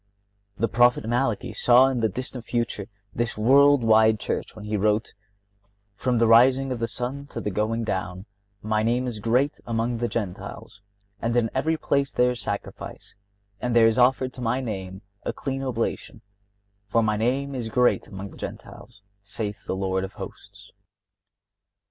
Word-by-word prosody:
(56) - - -14
The 115 - +3
Prophet 120 +1 +3
Malachy 120 -2 -1
saw 125 +2 +6
in 135 -2 0
the 110 -1 +2
distant 125 +4 -5
future 115 -4 -2 0.3
this 120 -1 -2
world 140 +4 +5
wide 110 -1 +5
Church, - - -4
when 105 -1 -9
he 105 0 -2
wrote: 105 +2 +1 0.8
"From 125 +4 0
the 115 - +4
rising 130 +4 +5
of 125 - -3
the 115 - -1
sun, 130 +5 -5
to - - -6
the 105 - -3
going 110 +4 -1
down, 95 -2 -3 0.4
My 110 0 +1
name 120 +3 +1
is 120 -4 -4
great 125 +7 +1
among 115 +1 -1
the 120 - 0
Gentiles; 100 -2 -6 0.4
and 115 +1 0
in 115 -2 +1
every 160 +5 0
place 140 -2 0
there 125 0 +3
is 125 - -6
sacrifice, 100 - -6 0.5
and 125 -1 -1
there 115 -1 +7
is 115 +2 +3
offered 130 +1 +3
to 125 - -9
My 125 +2 0
name 95 -5 -5 0.2
a - - -2
clean 135 -1 -4
oblation; 125 -4 -3 0.7
for 115 +3 +2
My 105 -1 +1
name 130 +6 0
is 120 -4 -4
great 125 +2 +2
among 95 0 -8
the - - -14
Gentiles, 100 - -9 0.2
saith 105 +1 -5
the - - -1
Lord 95 0 -1
of 95 - -6
Hosts." 100 +1 -11
115 Hz, 175 wpm, -25 LUFS, 105-125 Hz, 0.8 s, there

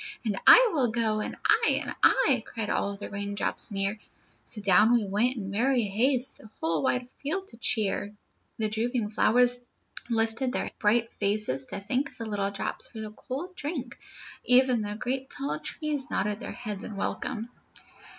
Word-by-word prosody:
'And 210 -3 0
I - - +9
will 265 -6 +2
go!' 220 -2 0
'And - - -4
I!' 455 - +4
'And - - -5
I!' - - +4
Cried 225 -3 -3
all 200 0 0
the 200 - -8
raindrops 200 +2 -2
near. 200 +1 -1 0.4
So 220 - +1
down 210 +3 +5
we 235 -3 +3
went 215 +6 +1
in 195 -3 -5
merry 245 +4 +2
haste 245 +6 +1
The 215 - -14
whole 160 -1 0
wide 250 - 0
field 375 +7 -3
to 230 - -12
cheer. 205 -3 0 0.5
"The 220 - +1
drooping 225 0 -1
flowers 245 +3 +3 0.5
lifted 230 +2 0
their - - -2
bright 230 +2 +2
faces 200 -11 0
to - - -5
thank 250 +8 -2
the 230 - -5
little 205 -2 -1
drops 200 -1 -3
for 225 - -10
the 215 -1 -5
cool 280 - -6
drink. 285 -7 -5 0.4
Even 250 -1 +4
the 205 0 -4
great 260 +4 -3
tall 150 +2 -3
trees 295 - -3
nodded 205 +1 -1
their - - -6
heads 215 -4 -6
in 215 - -7
welcome." 225 +3 -3
225 Hz, 170 wpm, -28 LUFS, 205-250 Hz, 0.5 s, I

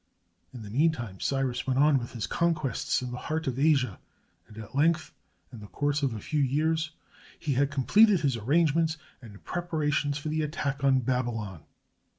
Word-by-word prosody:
In 120 -3 -9
the 100 - -9
mean 155 +8 +3
time, 115 -10 -7
Cyrus 135 -2 -1
went 130 -1 +1
on 145 0 +5
with 120 - -8
his 115 -3 -3
conquests 155 -6 0
in 125 - -5
the 125 - -5
heart 160 +1 -1
of 130 -1 -2
Asia, 135 - +2 0.5
and 105 - -15
at 110 -2 -9
length, 155 +3 +1 0.4
in 115 - -8
the 105 - -10
course 145 +5 -1
of 135 -5 0
a - - -5
few 150 +7 -2
years, 155 +4 +1 0.5
he 145 - -2
had 140 +2 +2
completed 190 - +4
his 135 -4 +1
arrangements 160 +6 +2 0.2
and 105 -4 -13
prepara 160 -4 -2
tions 145 0 0
for 150 +1 -5
the 155 +1 0
attack 145 -2 -3
on 135 -1 +4
Babylon. 115 - -2
140 Hz, 185 wpm, -28 LUFS, 125-155 Hz, 0.5 s, on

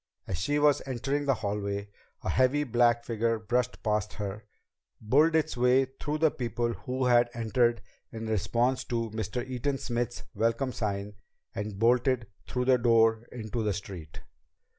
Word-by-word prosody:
As 90 - -4
she 145 +10 0
was 145 -1 +4
entering 135 +3 -1
the 135 -2 +3
hallway, 100 -1 -3 0.3
a - - -2
heavy 130 +3 +3
black 120 -2 +3
figure 115 0 0
brushed 125 +3 -1
past 105 -1 0
her, 105 +1 -6 0.5
bulled 150 +9 +3
its 160 -2 +1
way 125 +2 +4
through 145 +3 -4
the 160 -1 +3
people 120 -1 -2
who 130 +2 -3
had 120 -1 +4
entered 120 +1 +1 0.3
in 115 0 -6
response 115 +4 +1
to 115 -2 -2
Mr. 115 +3 -3
Eaton 130 +2 -1
Smith's 120 -1 -3
welcome 115 +4 0
sign, 100 -1 -3 0.4
and 105 -2 -4
bolted 120 +2 +3 0.2
through 125 0 -1
the 130 -1 +4
door 115 -1 +3
into 115 -1 -4
the 105 -2 0
street. 90 -6 -8
120 Hz, 155 wpm, -29 LUFS, 110-130 Hz, 0.5 s, was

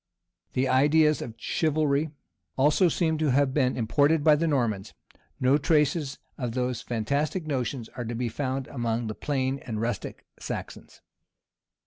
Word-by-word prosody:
[] - - -48
The 130 +1 +1
ideas 150 +2 +4
of 115 -2 -6
chivalry 155 -1 +1 0.5
also 150 +7 +4
seem 160 -1 0
to 155 -2 +2
have 135 0 +2
been 130 -3 +1
imported 145 +7 +2
by 155 -1 +6
the 165 +3 0
Normans: 115 -10 -1 0.4
no 130 +3 +3
traces 150 -2 +1 0.2
of 120 -3 -2
those 125 -1 -1
fantastic 140 - -1
notions 130 -4 -2
are 120 -1 -6
to 115 +1 -4
be 120 +1 -1
found 130 +2 -2
among 120 -2 -2
the 110 - -3
plain 135 +1 -1
and 110 -5 -5
rustic 115 -2 -4
Saxons. - - -7
135 Hz, 150 wpm, -27 LUFS, 120-150 Hz, 0.5 s, by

